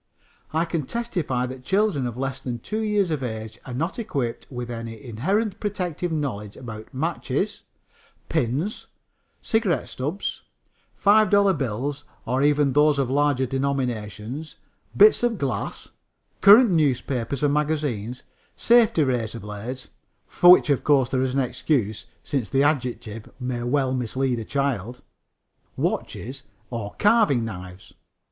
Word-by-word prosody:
I 160 +2 +1
can 165 -5 -3
testify 175 - -2
that 130 0 -8
children 190 -7 +1
of 120 0 -6
less 135 0 -3
than 120 -2 -4
two 215 - -4
years 210 -5 +1
of 150 -3 -1
age 110 -2 -5
are 125 - -6
not 165 - -2
equipped 140 - -3
with 120 -2 -5
any 115 -1 -6
inherited 185 - -1
protective 180 -4 -3
knowledge 120 -10 -3
about 110 -3 -9
matches, 155 +5 -2 0.7
pins, 140 - -1 0.6
cigarette 205 - 0
stubs, 150 +10 -4 0.6
$5 200 -2 +5
bills, 135 +2 -3 0.2
or 130 +2 0
even 145 -1 +3
those 150 +1 +4
of 135 -2 0
larger 140 -2 +2
denominations; 130 0 -3 0.4
bits 430 +1 +7
of 240 -2 +1
glass, 130 - -3 0.5
current 210 +3 +8
newspapers 140 -4 0
or 145 - +4
magazines, 145 -6 -1 0.3
safety 230 -9 +4
razor 120 -4 -1
blades 105 +5 -7 0.4
(for 175 - +4
which, 180 -4 +7
of 140 - +1
course, 135 -4 +3
there 130 -1 0
is 130 0 -1
an 140 - +3
excuse, 120 -4 -1 0.2
since 135 -6 -2
the 135 +1 +2
adjective 125 -6 -1
may 125 -1 -3
well 130 +1 +1
mislead 130 0 -1
a 110 - -6
child), 125 -4 -2 0.7
watches 130 +4 -3 0.3
or 110 -4 -5
carving 205 - +3
knives. 95 -3 -9
135 Hz, 135 wpm, -24 LUFS, 120-160 Hz, 0.7 s, current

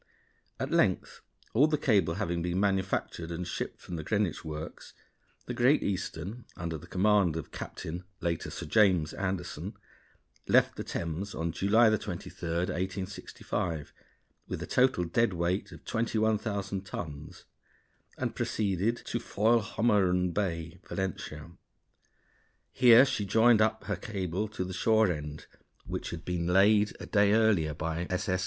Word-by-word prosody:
_ - - -34 0.6
At - - -3
length - - +1 0.3
all 140 +7 +5
the 155 -1 +1
cable 100 - +2
having 85 -4 -1
been 90 +2 -1
manufactured 95 -4 0
and 85 +1 -4
shipped - - -4
from 85 - -7
the 80 - -5
Greenwich 100 +1 0
works, 80 0 -7 0.5
the - - -4
Great 130 +5 +3
Eastern, 95 +3 -4
under 85 -1 -3
the 80 +3 -9
command 95 -2 +3
of 80 - -5
Captain 85 +3 -6 0.2
(later 85 -2 -2
Sir - - -6
James) 90 -4 +3
Anderson, 95 0 -4 0.7
left - - +4
the - - -4
Thames 85 +4 -4
on 85 0 -1
July 110 +5 +4
23, - - -6 0.2
1865, 90 -1 -3 0.5
with - - -4
a - - -4
total 125 -8 +3
dead 105 +5 +1
weight 85 +3 -1
of - - -13
21,000 110 -3 -1
tons, 75 -5 -7 0.7
and - - -2
proceeded 105 +2 0
to 115 - -2
Foilhommerun 105 -5 +2
Bay, 85 -4 -2
Valentia. 85 -4 -4 1.2
Here 125 +1 +7
she 130 -6 -1
joined 110 +3 +5
up 110 -1 +1
her - - -2
cable 95 -2 -3
to 105 -3 -4
the 95 0 -5
shore 110 +1 +3
end, 75 -2 -6 0.4
which - - -4
had 85 0 -7
been 85 -1 -1
laid 105 +3 +4
a - - -7
day 100 -1 +3
earlier 100 -9 +3
by 80 +3 -3
S.S. 90 0 0
95 Hz, 140 wpm, -30 LUFS, 85-110 Hz, 1.2 s, Here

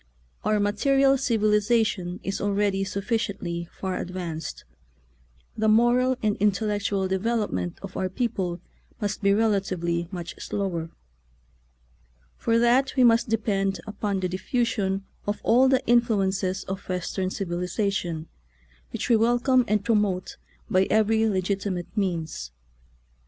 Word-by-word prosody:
Our 215 0 +2
ma 205 0 +2
teria] 270 +5 +3
civilization 210 -5 +1
is 195 - -3
already 200 -1 +1
sufficiently 195 -4 -3
far 190 -1 -4
advanced; 175 -3 -5 0.9
the 220 0 0
moral 240 +3 +4
and 210 -1 +2
intellectual 205 -1 0
development 190 - -1
of 190 -1 -8
our 185 - -1
people 190 -5 -2 0.4
must 205 -1 -2
be 200 - +3
rela 210 +1 +3
tively 170 -2 -3
much 175 -3 -7
slower. 175 -5 -3 1.5
For 230 0 +1
that 245 +4 +3
we 260 - +4
must 230 -1 +4
depend 200 -3 0
upon 205 -2 -2
the 185 - 0
diffusion 195 0 -1 0.2
of 205 - -1
all 245 +4 +5
of - - +4
the 265 0 +2
influences 195 -5 +1
of 190 +1 -6
Western 185 +1 -2
civilization, 180 -2 -2 0.7
which - - -3
we 235 - +5
welcome 245 +3 +3
and 210 -2 +1
promote 205 -5 0 0.3
by 185 +1 +2
every 220 +1 +3
legit 195 0 0
imate 180 -1 -4
means. 165 - -2
200 Hz, 125 wpm, -25 LUFS, 185-225 Hz, 1.5 s, all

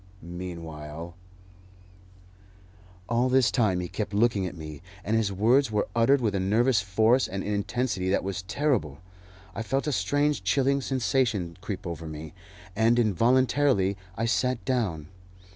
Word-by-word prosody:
Meanwhile 85 -2 -7 1.0
" 95 0 -26
All 120 +2 +1
this 130 -1 +4
time 95 -7 +1
he 90 - -4
kept 105 +2 -4
looking 105 -3 +2
at 90 - -8
me, 75 -2 -8 0.2
and 110 - 0
his 110 -3 +1
words 115 +6 +3
were 105 -1 0
uttered 125 +4 +4
with 110 -4 0
a 100 - 0
nervous 110 +4 +2
force 110 +6 +2
and 95 +1 -4
intensity 105 -1 -1
that 95 - +1
was 95 0 -3
terrible. 100 - -1 0.6
I - - -4
felt 135 +4 -1
a 150 - 0
strange 145 +8 0
chilling 140 0 +2
sensation 120 -9 0
creep 100 -2 -5
over 85 -2 -5
me, 80 0 -8 0.4
and 115 +2 +3
involuntarily 120 - +2 0.2
I 115 - 0
sat 125 +1 0
down. 100 - -1
105 Hz, 145 wpm, -27 LUFS, 90-125 Hz, 1.0 s, this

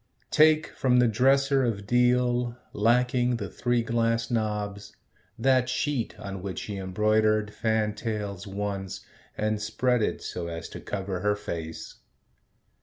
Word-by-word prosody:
Take 155 0 +5
from 125 -1 +1
the 125 -1 +5
dresser 135 +4 +3
of 105 -5 -1
deal, 125 +1 +2 0.2
Lacking 125 +3 +2
the 105 -4 -4
three 120 -1 0
glass 115 0 0
knobs, 105 -3 -2 0.4
that 130 +1 +3
sheet 125 -4 -2
On 100 -3 -6
which 95 -1 -4
she 105 -2 -5
embroidered 105 +2 +1
fantails 105 -3 -2
once 100 -1 -4 0.3
And 110 0 0
spread 125 +3 +1
it - - -1
so 85 -1 -4
as 85 -1 -6
to - - -8
cover 95 -2 -4
her 105 +2 +1
face. 80 -6 -6
110 Hz, 130 wpm, -27 LUFS, 100-125 Hz, 0.4 s, Take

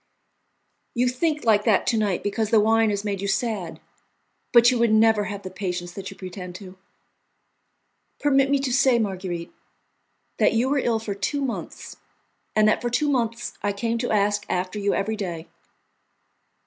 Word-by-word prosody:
"You 245 +1 +2
think 300 +3 -1
like 210 -2 +4
that 215 -4 +3
to 235 - +1
night 205 -5 0
because 205 +1 -1
the 225 - +5
wine 225 +1 +3
has 200 -1 -2
made 200 -2 -3
you 200 - -2
sad, 200 -5 -2 0.7
but 240 0 +7
you 250 - 0
would 235 -1 +3
never 220 -1 +4
have 200 -1 -6
the 185 - -7
patience 180 -2 -4
that 190 +1 -7
you - - -12
pretend 180 -1 -8
to." 185 -1 -10 1.4
"Permit 275 -2 +3
me 280 - +3
to 260 -3 -1
say, 265 -2 +4
Marguerite, 185 -5 -3 0.9
that - - +4
you 235 +3 +1
were 285 0 +2
ill 235 -3 +1
for 220 -2 -4
two 240 +9 -2
months, 255 -3 -6 0.6
and 215 0 +4
that 215 - +2
for 240 - -1
two 290 +5 +1
months 235 -2 -1
I 205 - -1
came 230 +3 -2
to 245 - -2
ask 205 0 +1
after 185 +3 -2
you 200 0 +1
every 220 +3 -1
day." 175 -6 -5
215 Hz, 175 wpm, -24 LUFS, 195-240 Hz, 1.4 s, but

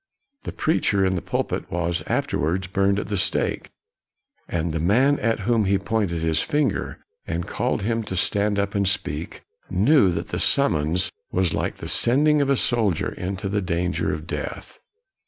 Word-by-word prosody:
The - - -3
preacher 100 - +1
in 95 - +1
the 90 - -2
pulpit - - -3
was 85 0 -1
afterwards 90 +6 0
burned 100 +2 +1
at 100 - -3
the 100 -3 -1
stake, - - 0 0.8
and 85 -1 -1
the 80 - -1
man 125 - +3
at 115 -1 0
whom 115 -3 +2
he 100 +1 +3
pointed 100 -5 -1
his 80 -1 +1
finger 145 -8 -1 0.3
and 85 +1 -2
called - - -1
him 115 +2 0
to 95 - -4
stand 100 +2 +1
up 100 0 -1
and 100 -1 +1
speak, 85 -5 -2 0.3
knew 105 +4 +4
that 85 0 -4
the - - -3
sum 140 0 +3
mons 80 +5 0 0.2
was 90 -2 +1
like - - -2
the - - -8
sending 145 +5 +3
of 140 - +1
a 140 - +3
soldier 110 -10 +1
into 95 +1 -4
the 100 +1 0
danger 90 -1 -1
of 75 0 -5
death. - - -6
95 Hz, 175 wpm, -23 LUFS, 85-115 Hz, 0.8 s, knew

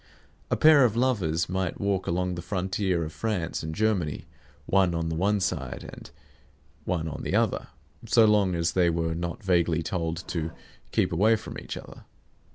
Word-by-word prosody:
A - - +2
pair 155 -3 +7
of 115 -3 +2
lovers 95 -10 +1
might 95 -1 -2
walk 100 -2 -1
along 90 +1 0
the 85 - -5
frontier 95 -1 -1
of 80 0 -6
France 90 -1 -2
and 80 0 -5
Germany, 95 -8 0 0.4
one 95 -3 +2
on 80 0 -1
the 80 - -2
one 100 +5 +1
side 95 - -3
and - - -11 0.8
one 85 -2 -1
on 80 - -5
the - - -2
other, - - +1 0.4
so 115 - +6
long 105 -4 +3
as 85 0 +1
they 90 -2 +3
were 80 -1 -1
not 85 +5 -4
vaguely 85 -3 +2
told 85 0 -3
to 80 -2 -3 0.4
keep - - +1
away 105 +7 +4
from 110 - -7
each - - -7
other. - - -11
90 Hz, 175 wpm, -27 LUFS, 85-100 Hz, 0.8 s, pair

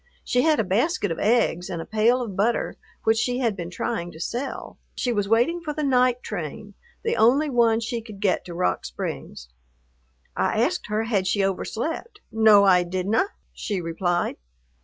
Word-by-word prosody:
She 250 - +1
had 310 +1 +3
a - - +3
basket 210 - 0
of 165 - -3
eggs 210 -6 +1
and 170 - -4
a 165 - -5
pail 230 +4 +2
of 205 -5 -6
butter, 220 +5 0 0.3
which 225 0 +3
she 245 +2 0
had 235 -5 0
been 175 -2 -5
trying 175 -1 -3
to 160 - -12
sell. 245 +10 -5 0.2
She 245 - -1
was 205 -2 -1
waiting 245 +10 +2
for 300 -3 -4
the 305 - -2
night 250 -2 +2
train, 205 +3 -6 0.3
the 460 0 0
only 275 +6 +3
one 230 -2 +3
she 230 +1 -3
could 215 -3 -11
get 195 -3 +1
to 175 - -8
Rock 180 - 0
Springs. - - -6 0.9
I - - 0
asked - - 0
her 210 +1 0
had 205 -5 0
she 195 +1 +2
overslept. 310 - -3
"No, 220 -2 +6
I 185 -2 +5
didna," 185 - 0 0.3
she 205 -3 -3
replied. 175 +1 -1
220 Hz, 180 wpm, -24 LUFS, 185-245 Hz, 0.9 s, No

